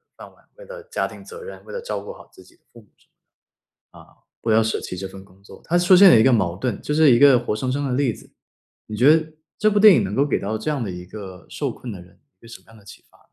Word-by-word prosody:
饭 - - -13
碗， - - -29
为 - - -15
了 - - -10
家 475 - -3
庭 - - -10
责 465 0 -11
任， 480 - -11
为 - - -11
了 485 - -5
照 - - -5
顾 475 - -9
好 - - -17
自 375 - -18
己 340 - -23
的 - - -39
父 120 - -16
母， 105 - -27 1.3
啊， - - -48
不 115 - -1
要 110 +1 +4
舍 110 - -2
弃 90 - -7
这 95 +1 -6
份 95 0 -13
工 95 0 -24
作， 100 - -16
它 175 - 0
出 180 +1 +5
现 195 0 +8
了 115 - +6
一 - - +4
个 130 -1 +4
矛 90 -6 0
盾， 115 0 -4
就 150 - -4
是 155 -3 +5
一 120 - +5
个 140 -3 +6
活 115 -3 -3
生 130 +4 -3
生 145 +1 -2
的 125 - -3
例 135 -2 0
子。 - - -14 0.6
你 110 - -7
觉 145 +7 +6
得 160 -1 -3 0.3
这 215 0 +2
部 205 - +1
电 210 -2 +8
影 110 - +1
能 95 - -5
够 140 +6 +1
给 145 - -1
到 110 +2 -3
这 155 - -5
样 145 -5 -2
的 100 - -5
一 90 0 -9
个 95 -2 -11
受 - - -4
困 120 -4 -9
的 90 - -10
人， 90 +1 -20 0.2
一 - - -63
个 115 - -16
什 115 - -11
么 - - -30
样 110 0 -18
的 100 - -20
启 100 - -15
发？ - - -27
125 Hz, 330 characters per minute, -21 LUFS, -, 1.3 s, 现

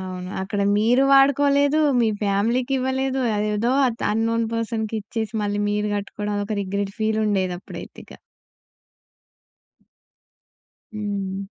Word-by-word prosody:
అవును. 185 -1 -6
అక్కడ 200 +1 -3 0.2
మీరు 235 +5 +3
వాడుకోలేదు, 280 +2 +4 0.2
మీ 230 - +3
ఫ్యామిలీకివ్వలేదు, 260 +6 0 0.2
అదేదో 210 +3 0
ఆత్ 235 -2 -3
అన్నోన్ 230 +1 0
పర్సన్‌కిచ్చేసి, 220 -1 -3
మళ్ళీ 205 0 -1
మీరు 210 0 -1
కట్టుకోవడం 205 +1 -4
అది 205 - -1
ఒక 215 0 -3
రిగ్రెట్ 200 +1 -3
ఫీలుండేది 210 -4 +1
అప్పుడైతే - - -10
ఇక. - - -15 2.8
హ్మ్. 200 -2 -3
215 Hz, 105 wpm, -23 LUFS, 205-245 Hz, 2.8 s, వాడుకోలేదు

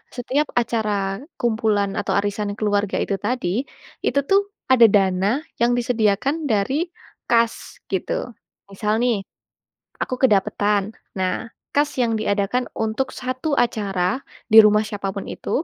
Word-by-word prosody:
setiap 265 +4 0
acara 225 -2 -1 0.5
kumpulan 220 -4 +1
atau - - -1
arisan 205 0 -2
keluarga 205 -1 0
itu 200 - -1
tadi, 245 -4 -1 0.6
itu 280 - +2
tuh 390 +1 +5 0.3
ada 240 -3 +8
dana 190 -1 +2 0.3
yang 240 +1 +4
disediakan 235 +2 +1 0.2
dari 215 +5 +1 0.5
kas, 230 -1 +1
gitu. 190 -2 -1 0.6
Misal 210 +2 -1
nih, 240 -4 +2 0.8
aku 255 - -1
kedapetan. 205 -1 +1 0.2
Nah, 185 +5 -1 0.3
kas 290 +1 +3
yang 230 -2 +1
diadakan 210 +4 0
untuk 225 +4 -1
satu 255 +4 -3
acara 200 -1 0 0.3
di 220 - +7
rumah 210 0 +5
siapa 200 -2 -4
pun 200 - -4
itu, - - -7
215 Hz, 125 wpm, -22 LUFS, 200-245 Hz, 0.8 s, ada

